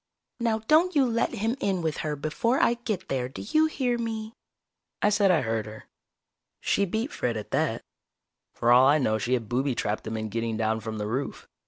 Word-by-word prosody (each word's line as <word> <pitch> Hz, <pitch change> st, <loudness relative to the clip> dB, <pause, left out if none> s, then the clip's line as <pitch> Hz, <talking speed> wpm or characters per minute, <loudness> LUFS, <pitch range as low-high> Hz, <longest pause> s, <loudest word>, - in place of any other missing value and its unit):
Now 225 Hz, -2 st, 0 dB
don't 335 Hz, +4 st, +4 dB
you 280 Hz, -2 st, +5 dB
let 230 Hz, -1 st, 0 dB
him 225 Hz, +4 st, 0 dB
in 190 Hz, -6 st, 0 dB
with 160 Hz, -2 st, -1 dB
her 150 Hz, -1 st, -2 dB
before 155 Hz, -, 0 dB
I -, -, +4 dB
get 230 Hz, -5 st, -4 dB
there, 125 Hz, -2 st, -2 dB
do 135 Hz, -, -8 dB
you 310 Hz, +6 st, +4 dB
hear 250 Hz, -6 st, -1 dB
me?" 225 Hz, -1 st, -4 dB, 0.7 s
I 205 Hz, -, +3 dB
said 205 Hz, -1 st, +3 dB
I 175 Hz, -4 st, +4 dB
heard 115 Hz, -2 st, -2 dB
her. 110 Hz, 0 st, -10 dB, 0.8 s
She 200 Hz, -, +1 dB
beat 220 Hz, +8 st, -2 dB
Fred 120 Hz, -2 st, -2 dB
at 105 Hz, -, -7 dB
that. -, -, 0 dB, 0.7 s
For 120 Hz, -, +2 dB
all 125 Hz, +2 st, +7 dB
I 145 Hz, +2 st, +5 dB
know 110 Hz, -6 st, +1 dB
she 120 Hz, +4 st, -1 dB
had 115 Hz, -3 st, -4 dB
booby 130 Hz, +2 st, 0 dB
trapped 105 Hz, -1 st, -2 dB
them 110 Hz, 0 st, -4 dB
in 110 Hz, 0 st, -3 dB
getting 115 Hz, +1 st, -2 dB
down 110 Hz, 0 st, 0 dB
from 110 Hz, 0 st, -5 dB
the 105 Hz, -, -3 dB
roof. 130 Hz, +6 st, -4 dB
150 Hz, 210 wpm, -27 LUFS, -, 0.8 s, all